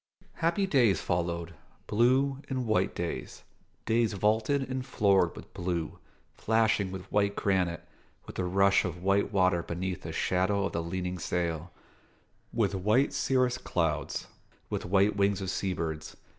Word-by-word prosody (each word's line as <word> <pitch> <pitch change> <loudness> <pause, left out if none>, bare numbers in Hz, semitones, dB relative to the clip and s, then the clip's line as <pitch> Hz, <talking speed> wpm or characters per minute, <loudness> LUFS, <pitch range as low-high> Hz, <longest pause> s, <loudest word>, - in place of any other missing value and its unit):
Happy 170 +4 +1
days 120 - +3
followed: 85 -1 -2 0.3
blue 130 +5 +2
and 130 -2 -2
white 110 -1 +1
days - - -5 0.4
days 115 -1 +2
vaulted 110 +7 +1
and 130 0 -3
floored 100 -8 +2
with - - -12
blue, 85 -3 -3 0.3
flashing 110 -3 +1
with 95 -1 -6
white 100 -1 +2
granite, 90 -4 0 0.4
with - - -10
the 95 - -1
rush 100 +2 +3
of 90 -1 -5
white 100 +1 +2
water 90 -3 +3
beneath 90 +2 -4
the - - -6
shadow 95 +2 +1
of - - -2
the 85 - -2
leaning 90 +1 -3
sail, 85 -1 -2 0.8
with 105 -4 +1
white 105 +8 +2
cirrus 130 -2 +1
clouds, 80 -3 -1 0.5
with - - -2
white 100 +3 +3
wings 100 0 +2
of 95 -1 -3
seabirds. 80 -6 -3
100 Hz, 145 wpm, -29 LUFS, 90-110 Hz, 0.8 s, days